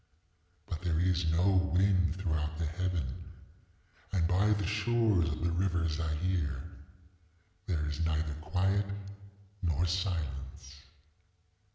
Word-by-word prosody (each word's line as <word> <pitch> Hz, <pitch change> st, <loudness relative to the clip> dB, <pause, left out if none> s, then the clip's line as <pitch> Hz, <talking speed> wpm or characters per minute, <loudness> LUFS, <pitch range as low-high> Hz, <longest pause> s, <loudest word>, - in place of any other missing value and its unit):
But 85 Hz, -5 st, -4 dB
there 85 Hz, -3 st, 0 dB
is 90 Hz, -2 st, +2 dB
no 90 Hz, +2 st, +3 dB
wind 90 Hz, -3 st, +3 dB
throughout 80 Hz, -4 st, -1 dB
the 85 Hz, -, -1 dB
heaven. 90 Hz, +2 st, -1 dB, 1.1 s
And 85 Hz, -4 st, +2 dB
by 95 Hz, +4 st, +3 dB
the 105 Hz, -2 st, +2 dB
shores 110 Hz, -3 st, +2 dB
of 75 Hz, +1 st, -4 dB
the 85 Hz, -, +1 dB
river 85 Hz, -1 st, +1 dB
Zaire 80 Hz, -2 st, -1 dB, 1.0 s
there 80 Hz, -6 st, 0 dB
is 75 Hz, +2 st, -2 dB
neither 80 Hz, -1 st, 0 dB
quiet 95 Hz, +5 st, +1 dB, 0.7 s
nor 85 Hz, -1 st, +1 dB
silence. 75 Hz, -6 st, -3 dB
85 Hz, 110 wpm, -32 LUFS, 80-95 Hz, 1.1 s, no